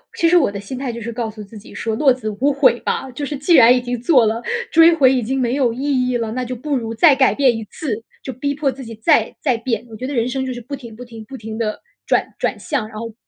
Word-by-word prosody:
其 335 Hz, -, +2 dB
实 350 Hz, +2 st, +5 dB
我 275 Hz, -11 st, +3 dB
的 200 Hz, -, -6 dB
心 205 Hz, +6 st, -7 dB
态 260 Hz, -1 st, -3 dB
就 235 Hz, 0 st, -7 dB
是 235 Hz, +2 st, -5 dB
告 230 Hz, -1 st, -3 dB
诉 215 Hz, -1 st, -9 dB
自 210 Hz, +2 st, -13 dB
己 210 Hz, -, -13 dB
说 225 Hz, -1 st, -3 dB
落 270 Hz, +2 st, +4 dB
子 235 Hz, -4 st, -5 dB
无 285 Hz, +2 st, +3 dB
悔 270 Hz, -3 st, +3 dB
吧， 270 Hz, -, -2 dB
就 285 Hz, +4 st, -5 dB
是 290 Hz, 0 st, -4 dB
既 290 Hz, +6 st, +1 dB
然 245 Hz, -5 st, +7 dB
已 250 Hz, -, 0 dB
经 245 Hz, -1 st, -4 dB
做 250 Hz, -3 st, +4 dB
了， 220 Hz, +2 st, -1 dB, 0.3 s
追 330 Hz, +1 st, +7 dB
回 265 Hz, -4 st, +5 dB
已 255 Hz, -2 st, 0 dB
经 265 Hz, +4 st, -2 dB
没 245 Hz, 0 st, 0 dB
有 255 Hz, -5 st, +1 dB
意 240 Hz, -, -8 dB, 0.3 s
义 250 Hz, -, 0 dB
了， 225 Hz, -2 st, -3 dB
那 255 Hz, +1 st, -2 dB
就 250 Hz, +1 st, -5 dB
不 285 Hz, +4 st, -3 dB
如 225 Hz, -2 st, -4 dB
再 290 Hz, +5 st, +5 dB
改 265 Hz, 0 st, +3 dB
变 260 Hz, -5 st, +2 dB
一 225 Hz, -, -5 dB
次， 225 Hz, 0 st, -5 dB, 0.2 s
就 265 Hz, -, -5 dB
逼 280 Hz, +4 st, -2 dB
迫 285 Hz, -1 st, 0 dB
自 265 Hz, +1 st, -9 dB
己 230 Hz, -1 st, -9 dB
再 220 Hz, -, +2 dB
再 255 Hz, -5 st, +1 dB
变。 230 Hz, 0 st, -3 dB
我 220 Hz, -, -10 dB
觉 250 Hz, -, -6 dB
得 285 Hz, -, -4 dB
人 235 Hz, -2 st, 0 dB
生 265 Hz, +1 st, -2 dB
就 260 Hz, -, -3 dB
是 245 Hz, -, -8 dB
不 275 Hz, +5 st, -6 dB
停 235 Hz, -5 st, -11 dB
不 245 Hz, +2 st, -10 dB
停 230 Hz, -2 st, -11 dB
不 265 Hz, +5 st, -9 dB
停 220 Hz, -1 st, -7 dB
地 215 Hz, -2 st, -3 dB, 0.2 s
转 -, -, 0 dB
转 -, -, -1 dB
向， 265 Hz, -8 st, -2 dB
然 215 Hz, -, -10 dB
后 230 Hz, 0 st, -6 dB
245 Hz, 320 characters per minute, -19 LUFS, 225-270 Hz, 0.3 s, 然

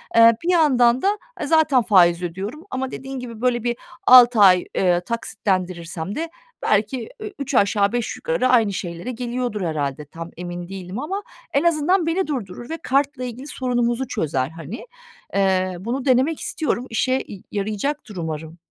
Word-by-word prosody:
Eee, 230 Hz, 0 st, +8 dB
bir 350 Hz, -, +2 dB
yandan 260 Hz, -7 st, +4 dB
da, 405 Hz, +2 st, +2 dB, 0.2 s
eee, 295 Hz, -, -2 dB
zaten 310 Hz, -5 st, +4 dB
faiz 180 Hz, -5 st, +4 dB
ödüyorum 195 Hz, -, -5 dB
ama 260 Hz, 0 st, -3 dB
dediğin 270 Hz, 0 st, -6 dB
gibi, 235 Hz, -3 st, -8 dB
böyle, 245 Hz, -2 st, +1 dB
bir 240 Hz, -1 st, -1 dB, 0.3 s
6 245 Hz, -2 st, +8 dB
ay, 185 Hz, -3 st, +6 dB
eee, 175 Hz, -2 st, +2 dB
taksitlendirirsem 185 Hz, -4 st, -3 dB
de 330 Hz, +1 st, -3 dB, 0.3 s
belki 215 Hz, +3 st, 0 dB
ü 425 Hz, -2 st, -6 dB
üç 280 Hz, -1 st, -3 dB
aşağı 200 Hz, -1 st, +3 dB
beş 240 Hz, -2 st, -2 dB
yukarı 485 Hz, -, 0 dB
aynı 225 Hz, -5 st, +4 dB
şeylere 175 Hz, +6 st, -5 dB
geliyordur, 240 Hz, -3 st, -3 dB
herhâlde. 150 Hz, -3 st, -2 dB
Tam 165 Hz, +3 st, -9 dB
emin 175 Hz, 0 st, -6 dB
değilim 190 Hz, +3 st, -6 dB
ama 390 Hz, +8 st, -3 dB, 0.3 s
en 280 Hz, -, +2 dB
azından 340 Hz, +2 st, +2 dB
beni 350 Hz, +3 st, 0 dB
durdurur 240 Hz, -6 st, -5 dB
ve 325 Hz, -, -3 dB
kartla 275 Hz, 0 st, 0 dB
ilgili 250 Hz, +3 st, -6 dB
sorunumuzu 245 Hz, -1 st, -1 dB
çözer, 145 Hz, -, -1 dB
hani. 165 Hz, -, -8 dB, 0.5 s
Eee, 185 Hz, -1 st, +1 dB
bunu 240 Hz, +7 st, -3 dB
denemek 265 Hz, +4 st, +3 dB
istiyorum, 275 Hz, -6 st, -2 dB
işe 255 Hz, +3 st, 0 dB
y 195 Hz, -, -9 dB
yarayacaktır 215 Hz, +4 st, -3 dB
umarım. 160 Hz, -1 st, -5 dB
235 Hz, 160 wpm, -22 LUFS, 185-265 Hz, 0.5 s, Eee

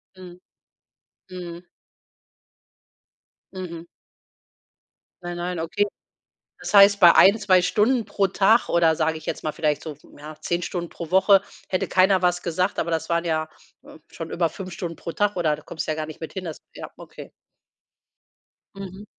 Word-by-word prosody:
Mhm. 180 Hz, -1 st, -13 dB, 0.9 s
Mhm. 175 Hz, -1 st, -9 dB, 1.9 s
Mhm. 170 Hz, -3 st, -7 dB, 1.4 s
Nein, 175 Hz, 0 st, -5 dB
nein, 175 Hz, 0 st, -4 dB
okay. 165 Hz, +6 st, 0 dB, 0.7 s
Das -, -, -6 dB
heißt, 200 Hz, 0 st, +7 dB
bei 175 Hz, -2 st, +7 dB
1, 200 Hz, +3 st, +7 dB
2 190 Hz, -3 st, +4 dB
Stunden 220 Hz, +7 st, +1 dB
pro 200 Hz, -1 st, 0 dB
Tag 205 Hz, +5 st, +3 dB
oder, 165 Hz, -2 st, +3 dB
sage 160 Hz, 0 st, 0 dB
ich 155 Hz, -, -12 dB
jetzt -, -, -4 dB
mal, 155 Hz, -, -2 dB
vielleicht 150 Hz, -2 st, -1 dB
so, 155 Hz, -2 st, -7 dB, 0.2 s
ja, 150 Hz, +1 st, -10 dB
10 175 Hz, 0 st, -2 dB
Stunden 175 Hz, -1 st, -4 dB
pro 170 Hz, -2 st, -8 dB
Woche 190 Hz, +2 st, +5 dB, 0.3 s
hätte 185 Hz, -, -1 dB
keiner 185 Hz, 0 st, +3 dB
was 180 Hz, -1 st, +1 dB
gesagt, 180 Hz, +3 st, -1 dB
aber 170 Hz, -, -2 dB
das 160 Hz, -1 st, -2 dB
waren 170 Hz, 0 st, +1 dB
ja, 155 Hz, -1 st, -1 dB, 0.4 s
äh, -, -, -14 dB
schon 165 Hz, -1 st, -7 dB
über 170 Hz, -2 st, 0 dB
5 185 Hz, +3 st, -8 dB
Stunden 170 Hz, -2 st, -6 dB
pro 170 Hz, -, -6 dB
Tag 205 Hz, -1 st, 0 dB
oder 160 Hz, -4 st, +1 dB
da 150 Hz, -, -14 dB
kommst 160 Hz, -, -6 dB
ja 155 Hz, -, -1 dB
gar 155 Hz, 0 st, -3 dB
nicht 155 Hz, -1 st, -11 dB
mit 160 Hz, -, -8 dB
hin. 190 Hz, -, -5 dB
Das 160 Hz, -, -7 dB
ja, -, -, -8 dB
okay. -, -, -12 dB, 1.5 s
Mhm. 195 Hz, +1 st, -9 dB
175 Hz, 165 wpm, -23 LUFS, 165-190 Hz, 1.9 s, heißt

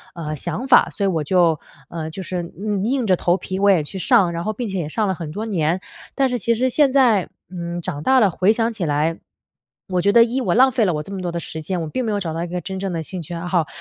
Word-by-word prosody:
呃， 155 Hz, -2 st, -4 dB
想 245 Hz, -, -4 dB
法， 250 Hz, -, +6 dB
所 200 Hz, -, -4 dB
以 -, -, +3 dB
我 165 Hz, -5 st, 0 dB
就， 170 Hz, -1 st, +3 dB, 0.3 s
呃， 160 Hz, -1 st, -5 dB
就 185 Hz, +4 st, -7 dB
是 180 Hz, 0 st, -3 dB, 0.2 s
硬 205 Hz, -1 st, -2 dB
硬 255 Hz, -1 st, 0 dB
着 185 Hz, -, +4 dB
头 175 Hz, +1 st, +1 dB
皮 190 Hz, 0 st, -5 dB
我 200 Hz, -, +4 dB
也 180 Hz, -6 st, +4 dB
去 190 Hz, +6 st, -6 dB
上， 175 Hz, +1 st, +4 dB
然 170 Hz, 0 st, -3 dB
后 215 Hz, -, -1 dB
并 235 Hz, +1 st, -4 dB
且 190 Hz, -2 st, -3 dB
也 155 Hz, -2 st, -3 dB
上 215 Hz, +4 st, 0 dB
了 190 Hz, -, +1 dB
很 165 Hz, -3 st, -6 dB
多 215 Hz, +6 st, -4 dB
年。 175 Hz, -4 st, 0 dB, 0.4 s
但 270 Hz, -1 st, +3 dB
是 245 Hz, -1 st, -1 dB
其 230 Hz, +3 st, +1 dB
实 255 Hz, +3 st, +1 dB
现 280 Hz, +1 st, +3 dB
在， 245 Hz, -8 st, +3 dB, 0.2 s
嗯， 175 Hz, -1 st, -5 dB
长 155 Hz, -5 st, -4 dB
大 265 Hz, 0 st, +4 dB
了 205 Hz, -6 st, +4 dB
回 185 Hz, +5 st, +3 dB
想 230 Hz, 0 st, 0 dB
起 190 Hz, -6 st, -3 dB
来， 150 Hz, +2 st, 0 dB, 0.7 s
我 180 Hz, -1 st, +1 dB
觉 200 Hz, +2 st, +3 dB
得 235 Hz, +1 st, +7 dB
一， 245 Hz, +3 st, -1 dB
我 240 Hz, -, 0 dB
浪 260 Hz, +2 st, +6 dB
费 230 Hz, -, +1 dB
了 180 Hz, -, +1 dB
我 150 Hz, -, -3 dB
这 195 Hz, -, -11 dB
么 190 Hz, -, -4 dB
多 175 Hz, -1 st, -3 dB
的 170 Hz, -, -3 dB
时 160 Hz, -1 st, -6 dB
间， 180 Hz, +3 st, -3 dB
我 -, -, -4 dB
并 255 Hz, +11 st, -3 dB
没 220 Hz, -, -1 dB
有 205 Hz, -, 0 dB
找 165 Hz, -5 st, -3 dB
到 165 Hz, +1 st, -3 dB
一 -, -, -4 dB
个 180 Hz, +1 st, -3 dB
真 190 Hz, +2 st, -5 dB
正 195 Hz, -1 st, -3 dB
的 165 Hz, -, -3 dB
兴 180 Hz, +2 st, -6 dB
趣 170 Hz, +2 st, -7 dB
爱 170 Hz, +1 st, -5 dB
好。 175 Hz, -4 st, +1 dB
185 Hz, 315 characters per minute, -21 LUFS, 170-220 Hz, 0.7 s, 得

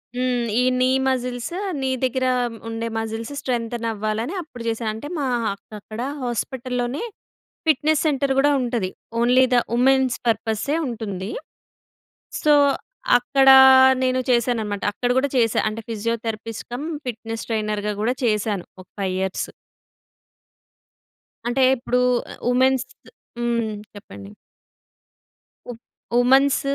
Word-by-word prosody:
హ్మ్. 250 Hz, -1 st, 0 dB
ఈ -, -, +2 dB, 0.2 s
నీ 255 Hz, -, +3 dB, 0.2 s
మజిల్స్, 250 Hz, +2 st, -2 dB, 0.3 s
నీ 265 Hz, -, 0 dB
దగ్గర 260 Hz, 0 st, 0 dB, 0.4 s
ఉండే 230 Hz, 0 st, -3 dB
మాజిల్స్ 225 Hz, +3 st, -4 dB
స్ట్రెంతెన్ 235 Hz, -2 st, -2 dB
అవ్వాలని 215 Hz, -, -3 dB
అప్పుడు 245 Hz, -7 st, -10 dB
చేశా 225 Hz, 0 st, -2 dB
అంటే 225 Hz, +7 st, -7 dB
మా 280 Hz, -3 st, -1 dB, 0.3 s
అక్ 215 Hz, +1 st, -14 dB
అక్కడ 215 Hz, +3 st, -8 dB, 0.2 s
హాస్పిటల్‍లోనే 245 Hz, -, -3 dB, 0.6 s
ఫిట్‍నెస్ 310 Hz, +1 st, +2 dB
సెంటర్ 275 Hz, -2 st, +1 dB
కూడా 290 Hz, +1 st, +4 dB
ఉంటది. 235 Hz, -6 st, -1 dB, 0.3 s
ఓన్లీ 250 Hz, +2 st, +5 dB
ద -, -, +5 dB, 0.2 s
వుమెన్స్ 260 Hz, +1 st, +3 dB
పర్పసె 225 Hz, +5 st, 0 dB
ఉంటుంది. 210 Hz, -4 st, -5 dB, 1.1 s
సో 300 Hz, -, +4 dB, 0.7 s
అక్కడ 270 Hz, +2 st, +2 dB, 0.5 s
నేను 255 Hz, 0 st, +1 dB
చేశాననమాట. 225 Hz, -4 st, 0 dB
అక్కడ 245 Hz, +5 st, -2 dB
కూడా 280 Hz, -, +1 dB
చేశా. 230 Hz, -3 st, +2 dB
అంటే 225 Hz, +1 st, -6 dB
ఫిజియోథెరపిస్ట్ 225 Hz, 0 st, -4 dB
కం 250 Hz, +4 st, -4 dB, 0.2 s
ఫిట్నెస్ 225 Hz, -1 st, -5 dB
ట్రైనర్‌గా 210 Hz, -1 st, -1 dB
కూడా 245 Hz, +3 st, +1 dB
చేశాను 210 Hz, -4 st, 0 dB, 0.2 s
ఒక -, -, -25 dB
5 190 Hz, -2 st, -1 dB
ఇయర్స్. 190 Hz, 0 st, -2 dB, 2.0 s
అంటే 245 Hz, +2 st, 0 dB, 0.2 s
ఇప్పుడు 250 Hz, 0 st, 0 dB, 0.5 s
ఉమెన్స్ 260 Hz, 0 st, +3 dB, 0.5 s
హ్మ్. 235 Hz, -2 st, 0 dB, 0.3 s
చెప్పండి. 100 Hz, -, -11 dB, 1.4 s
ఉ 245 Hz, -, -4 dB, 0.5 s
ఉమాన్స్ 265 Hz, +3 st, +4 dB
240 Hz, 110 wpm, -22 LUFS, 220-255 Hz, 2.0 s, ఓన్లీ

